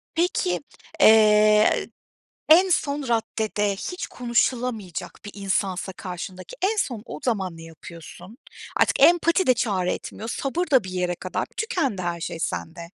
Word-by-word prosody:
Peki, 255 - 0 0.4
eee, 215 -1 +5 0.6
en 360 +4 +7
son 290 -4 0
raddede 215 -3 -1
hiç 360 - -5
konuşulamayacak 235 -5 -2
bir 205 - -7
insansa 195 -1 -2
karşındaki 180 -1 -8
en 425 +3 +1
son 240 - -1
o - - -8
zaman 190 -9 -1
ne 165 - -11
yapıyorsun? 170 +6 -12 0.4
Artık - - +2
empati 345 +2 +4
de 255 - +6
çare 195 -7 0
etmiyor, 225 - -7
sabır 305 +9 -2
da 260 -5 +5
bir 190 - -7
yere 180 -1 -2
kadar, 185 +1 -4
tükendi 335 - -1
her 175 -1 -3
şey 170 0 -5
sende. 165 0 -4
210 Hz, 140 wpm, -24 LUFS, 185-260 Hz, 0.6 s, en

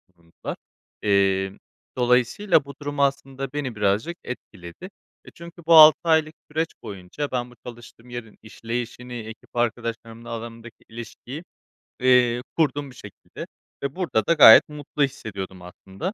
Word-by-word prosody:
bulundular. 85 -1 -8 0.5
Eee, 95 -1 +2 0.5
dolayısıyla 125 - +2
bu 140 - -9
durum 145 0 -5
aslında 135 -1 -1
beni 140 -5 -3
birazcık 105 - 0
etkiledi. 105 - -9 0.4
E, - - -13
çünkü 170 +1 -12
bu 165 - +6
6 155 -1 +10
aylık 160 -2 +2 0.2
süreç 160 +2 0 0.2
boyunca 100 +9 -6
ben 125 -1 -3
bu - - -17
çalıştığım 120 0 -12
yerin 120 -3 -8
işleyişini, 120 +2 -6
ekip 110 -1 -9
arkadaşlarımla 115 0 -3
alanımdaki 115 0 -8
ilişkiyi, 120 +6 -9 0.6
eee, 125 -1 +4 0.2
kurdum 145 -3 0
bir - - -16
şekilde 100 -4 -11 0.4
ve 140 0 -3
burada 175 -12 0
da 170 - +5
gayet 140 -7 +9
mutlu 150 0 -3
hissediyordum 100 -9 -5
aslında. 95 - -7
120 Hz, 135 wpm, -24 LUFS, 110-145 Hz, 0.6 s, 6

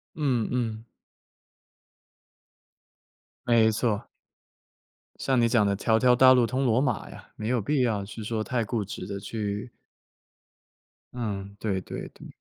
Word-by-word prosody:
嗯 130 -8 0
嗯。 115 -2 -2 2.6
没 115 -2 +4
错。 110 0 -1 1.1
像 130 -2 +1
你 115 - +4
讲 115 -3 +3
的 100 - +1
条 110 +3 +2
条 125 +1 +5
大 130 +1 +7
路 125 -2 +4
通 130 +3 -1
罗 120 +1 +3
马 125 -7 -1
呀， - - -13
没 110 - -4
有 125 0 +1
必 140 +5 +1
要 110 -5 +1
去 110 +2 -8
说 110 0 -2
太 120 -1 -1
固 110 0 -2
执 90 -1 -7
的 100 -1 -4
去 105 +2 -4 1.4
嗯， 100 -4 -4
对 100 -4 -1
对 - - -7
对。 - - -13
115 Hz, 150 characters per minute, -27 LUFS, 105-125 Hz, 2.6 s, 大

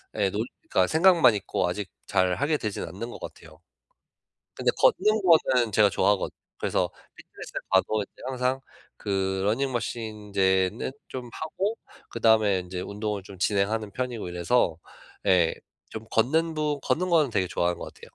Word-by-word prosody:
예. 100 -2 +2
논 105 +3 -2 0.3
그러니까 90 0 +3
생각만 165 -7 +5
있고 95 -2 -1
아직 95 +2 -4 0.2
잘하게 100 - +1
되지는 105 -8 -4
않는 110 +7 -6
것 - - -9
같아요. - - -11 1.0
근데 - - +1
걷는 220 - +3
거는 130 - +4
제가 105 0 +5
좋아하거든. 100 -2 +1 0.2
그래서 - - 0 0.3
피트니스에 - - -8
가도 100 +3 +2
이제 100 - -13
항상 130 0 -1 0.4
그 95 -2 -1
러닝머신 120 +2 -1
인제는 100 0 0 0.2
좀 125 -2 -6
하고 195 +8 -3 0.3
그다음에 110 -4 +3
인제 90 0 -6
운동을 105 +1 -4
좀 95 0 -12
진행하는 105 +2 0
편이고 125 -5 -4
이래서 90 0 +1 0.5
예. 90 -4 +4 0.4
좀 110 0 -7
걷는 160 +8 +2
부 150 -2 -1
걷는 180 +2 0
거는 155 -6 +4
되게 95 -4 +1
좋아하는 85 0 -1
것 - - -6
같아요. - - -21
110 Hz, 335 characters per minute, -26 LUFS, 95-130 Hz, 1.0 s, 생각만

